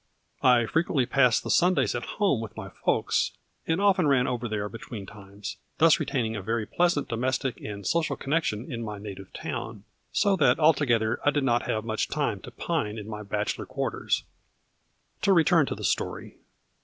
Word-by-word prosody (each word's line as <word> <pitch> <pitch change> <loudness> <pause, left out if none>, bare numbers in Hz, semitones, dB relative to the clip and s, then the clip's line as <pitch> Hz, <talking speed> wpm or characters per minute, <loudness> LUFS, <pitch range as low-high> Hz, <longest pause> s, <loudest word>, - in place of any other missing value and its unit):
I 125 -2 +5
frequently 155 -1 +1
passed 125 -2 +3
the - - -2
Sundays 170 - +3
at 120 - -3
home 195 - +2
with 115 - -8
my 100 -3 -6
folks, - - 0 0.3
and 165 +2 +1
often 195 -5 +3
ran 135 -3 +4
over 120 -2 -2
there 105 -1 -2
between 115 -1 -8
times, 100 0 -9 0.2
thus 160 0 +5
retain 125 -4 -1
ing 110 0 -3
a 100 - -3
very 115 +3 -1
pleasant 170 +5 +1
domestic 130 +2 -1
and 100 -2 -7
social 165 - 0
connec 155 +4 0
tion 110 +7 -3
in 115 -1 -4
my 105 -2 -5
native 100 -2 -9
town; 110 -2 -5 0.3
so 200 -2 +3
that 155 - +4
altogether 125 -8 +3
I - - +4
did 145 -1 0
not 120 -2 +1
have 110 0 -1
much 110 -1 -1
time - - -1
to - - -9
pine 105 +1 -2
in 105 -1 -7
my 105 -1 -6
bachelor 105 0 -3
quarters. - - -1 1.0
To 195 - +4
return 165 -3 +4
to - - -3
the - - -9
story. - - -2
120 Hz, 185 wpm, -27 LUFS, 105-150 Hz, 1.0 s, I